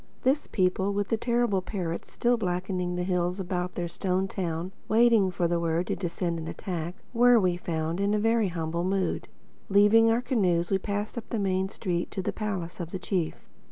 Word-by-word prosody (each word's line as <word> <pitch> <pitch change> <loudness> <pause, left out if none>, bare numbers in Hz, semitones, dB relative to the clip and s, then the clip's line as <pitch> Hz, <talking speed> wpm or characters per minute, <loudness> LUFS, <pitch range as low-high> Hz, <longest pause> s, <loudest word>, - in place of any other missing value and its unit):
This 275 +3 +2
people, 190 +1 +1
with 205 0 -1
the 225 - +3
terrible 235 -4 +1
parrots 180 -3 -4
still 245 0 +2
blackening 180 -3 -2
the 180 - -1
hills 180 0 0
about 180 -1 -2
their 175 -1 -2
stone 185 +2 -1
town, 175 -1 -3 0.2
waiting 225 -3 +5
for 175 -1 0
the 170 0 0
word 165 +1 0
to - - -1
descend 170 -2 -2
and 160 - -5
attack, 175 -1 -4 0.2
were, 245 0 +6
we 180 -3 +2
found, 165 -1 -2
in 200 +1 +2
a - - +1
very 225 0 +2
humble 170 -1 -2
mood. 190 +1 -1 0.4
Leaving 205 +3 +6
our 230 +2 +2
canoes 180 -9 +1
we 195 - +3
passed 205 +4 -3
up 225 - -13
the 230 - -1
main 190 -1 0
street 175 -4 -2
to 190 - -4
the - - -2
palace 195 -6 -4
of 170 -2 -4
the 190 - -4
chief. 180 -3 -2
185 Hz, 195 wpm, -27 LUFS, 175-210 Hz, 0.4 s, were